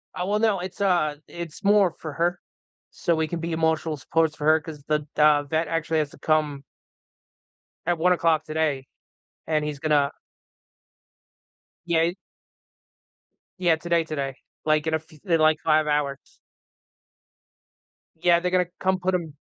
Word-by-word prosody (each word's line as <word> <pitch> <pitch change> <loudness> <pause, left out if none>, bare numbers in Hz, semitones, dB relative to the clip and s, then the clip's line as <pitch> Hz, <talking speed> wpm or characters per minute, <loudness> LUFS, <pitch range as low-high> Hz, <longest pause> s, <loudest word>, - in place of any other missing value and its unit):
Uh, 180 - -2
well, 210 +1 +1
no, 215 -4 +2
it's, 185 +3 -7
uh, 175 -6 +2
it's 170 -1 -8
more 200 -4 +4
for 155 -3 -6
her, 175 +4 0 0.5
so 170 - 0
we 160 0 0
can 170 +1 -4
be 165 +1 -4
emotional 160 -1 0
supports 160 +2 0
for 150 - -5
her, 160 +1 +5
'cause 150 -3 -10
the, 150 -1 0
uh, 150 -1 +5
vet 160 +3 -1
actually 165 -1 0
has 150 -2 -1
to - - -16
come 150 -3 0 1.2
at 175 0 +1
1:00 165 -2 +2
today, 155 -4 -1 0.6
and 155 -1 0
he's 150 -2 -4
gonna 145 -2 +2 1.8
Yeah, 170 -2 +2
i 175 +2 0 1.4
Yeah. 175 -3 +3
Today, 170 +1 0
today, 140 -4 -4 0.3
like, 155 0 +2
in 160 - 0
a - - +3
f 160 - -17 0.2
in, 170 -4 +2
like, 155 0 +4
5 155 -1 +3
hours. 145 -2 0 2.0
Yeah, 175 -1 +5
they're 180 +1 -2
gonna 180 -1 +2
come 190 0 +1
put 185 +1 0
him 165 -4 -4
160 Hz, 155 wpm, -25 LUFS, 150-175 Hz, 2.0 s, her